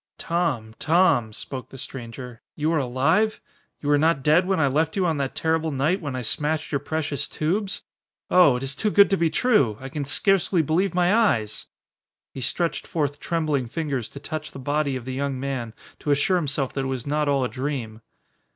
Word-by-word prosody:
"Tom 155 -11 -1
Tom," 160 -9 +3
spoke 130 +4 -7
the 135 - -11
stranger, 125 -2 -8
"you 155 +2 0
are 160 - +2
alive? 140 - +1 0.4
You 145 - -2
were 145 0 +4
not 155 -3 +2
dead 160 +5 +4
when 190 -2 +1
I 150 - +4
left 155 +4 +1
you 190 -2 +1
on 160 -3 +1
that 135 -1 -2
terrible 160 0 +1
night 155 +7 0
when 145 -5 -4
I 125 - -3
smashed 155 +6 -1
your 140 - +1
precious 145 -1 -2
tubes? 195 +6 -2 0.4
Oh 180 -8 +6
it 125 - -4
is 135 0 -1
too 215 - 0
good 200 0 +5
to - - +5
be 170 -3 +2
true! 155 - +2
I 135 - -7
can 145 +1 -3
scarcely 185 +3 +2
believe 175 +6 +1
my 180 +1 +3
eyes!" 115 - +1 0.7
He 135 - -6
stretched 170 +6 -1
forth 145 -3 -1
trembling 155 -6 -1
fingers 140 -4 -3
to 140 - -10
touch 155 +2 -6
the - - -8
body 145 +1 -1
of 125 -2 -6
the 130 - -4
young 135 0 -2
man 130 -5 -4 0.2
to - - -5
assure 145 +6 +3
himself 140 -5 -1
that 135 -1 -2
it - - -1
was 130 -2 -3
not 150 0 0
all 140 -2 +2
a - - +1
dream. 125 -5 -4
145 Hz, 205 wpm, -24 LUFS, 130-165 Hz, 0.7 s, Oh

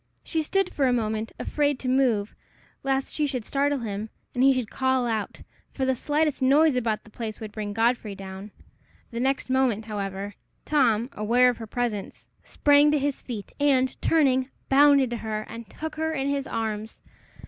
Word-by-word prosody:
She 320 - -1
stood 385 +4 0
for 275 -2 +2
a 250 - +3
moment, 220 -1 -1
afraid 290 -2 0
to 255 - -6
move, 250 -6 +2 0.5
lest 270 0 -1
she 300 -1 0
should 255 -5 -3
startle 285 +1 +1
him, 215 -3 -4 0.2
and 250 - +1
he 270 - +7
should 255 -4 -1
call 260 -1 +1
out, 220 -3 -3 0.3
for 265 - -2
the 260 - +2
slightest 295 +2 0
noise 285 +3 +5
about 225 -4 -1
the 215 - -17
place 220 -1 -6
would 215 -2 -7
bring 210 -1 -4
Godfrey 225 -1 0
down. 195 +1 -8 0.6
The 235 - -4
next 265 +2 0
moment, 250 -5 +2
however, 200 -1 -4 0.3
Tom, 245 -4 +2
aware 240 +4 +3
of 245 - -9
her 225 - -7
presence, 225 -3 -3 0.2
sprang 290 0 +4
to 300 - +3
his 285 -1 -1
feet, 220 -6 -7
and, 265 -3 +3
turning, 265 -5 +3 0.2
bounded 275 -2 +5
to 240 - -2
her, 215 -1 -4
and 230 -1 -9
took 315 -1 -6
her 320 0 0
in 270 -3 -1
his 280 -1 -1
arms. 220 -1 -4
250 Hz, 180 wpm, -26 LUFS, 220-275 Hz, 0.6 s, he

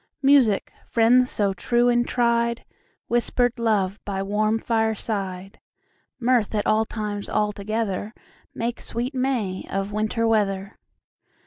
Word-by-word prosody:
Music, 270 -7 +4
friends 245 +2 +4
so 200 -2 0
true 240 +5 +1
and 240 0 +2
tried, 235 -1 +1 0.4
Whisper'd 240 0 +1
love 205 -4 +1
by 195 -1 -3
warm 215 +2 +1
fireside, 210 -4 -2 0.6
Mirth 240 -3 +1
at 210 - 0
all 220 +1 +3
times 210 -2 -5
all 210 0 +1
together, 210 0 -3 0.4
Make 235 +1 -3
sweet 245 +4 -4
May 250 -8 -1
of 195 +1 -2
Winter 215 +2 0
weather. 200 -3 0
220 Hz, 120 wpm, -24 LUFS, 205-235 Hz, 0.6 s, Music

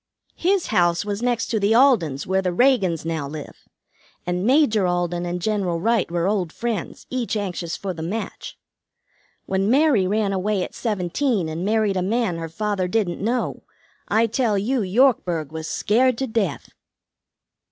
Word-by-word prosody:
His 375 +1 +1
house 175 -1 +2
was 205 +1 -3
next 240 -2 0
to 220 - 0
the 205 +2 +2
Aldens', 210 - +3
where 190 +1 +1
the 185 - -1
Reagans 190 - +2
now 160 -3 -2
live, 150 0 -9 0.6
and 180 +1 -1
Major 230 -6 +3
Alden 175 0 -1
and 175 +1 -3
General 190 -4 -1
Wright 230 +3 +1
were 170 +1 0
old 195 -5 0
friends, 230 -4 -4
each 245 -4 -1
anxious 180 -4 -3
for 195 -2 -4
the 160 - -8
match. 195 +8 -5 0.9
When 195 +1 0
Mary 260 -7 +4
ran 205 0 0
away 195 0 0
at - - -7
seventeen 210 - -1
and 160 +2 -4
married 210 -1 +1
a - - +1
man 205 -2 0
her 165 0 -5
father 200 +1 -1
didn't 185 -3 -1
know, 240 +4 -1 0.5
I 220 +2 +3
tell 225 -2 0
you 240 +6 0
Yorkburg 185 - +2
was 160 0 -5
scared 245 +8 +2
to 270 - -1
death." 220 - -2
200 Hz, 165 wpm, -22 LUFS, 175-230 Hz, 0.9 s, Mary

